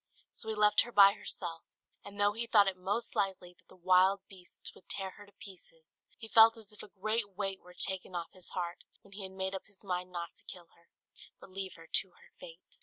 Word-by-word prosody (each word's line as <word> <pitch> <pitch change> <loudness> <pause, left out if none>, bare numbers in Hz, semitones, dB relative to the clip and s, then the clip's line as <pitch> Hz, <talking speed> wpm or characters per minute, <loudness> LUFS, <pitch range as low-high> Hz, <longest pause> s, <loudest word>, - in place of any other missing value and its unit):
So 220 - -7
he 220 - -1
left 210 0 +5
her 240 - -5
by 200 -2 +8
herself, 165 -5 -4 0.4
and 205 0 -11
though 205 0 +3
he 230 +2 -3
thought 205 -3 +6
it 190 - 0
most 205 +6 -2
likely 190 -3 -1
that - - -32
the - - -17
wild 185 +2 +4
beasts 185 -2 -11
would - - -20
tear 190 -1 -3
her 205 +1 -14
to - - -19
pieces, 165 -4 -14 0.2
he 225 - -9
felt 225 +1 +7
as 215 -2 -11
if 210 - -12
a - - -10
great 210 0 -2
weight 195 -2 -3
were 180 0 -16
taken 190 -1 -4
off 170 -1 -4
his 185 -2 -14
heart 175 -1 -4 0.2
when 200 - -19
he 205 - -6
had 190 -1 -5
made 190 0 -3
up 190 - -6
his 200 0 -16
mind 180 -1 -3
not 170 -1 -5
to - - -19
kill 175 -2 -10
her, 170 - -28 0.5
but - - -14
leave 190 -1 -5
her 165 - -14
to - - +2
her - - -21
fate. - - -14
195 Hz, 240 wpm, -32 LUFS, 180-205 Hz, 0.5 s, by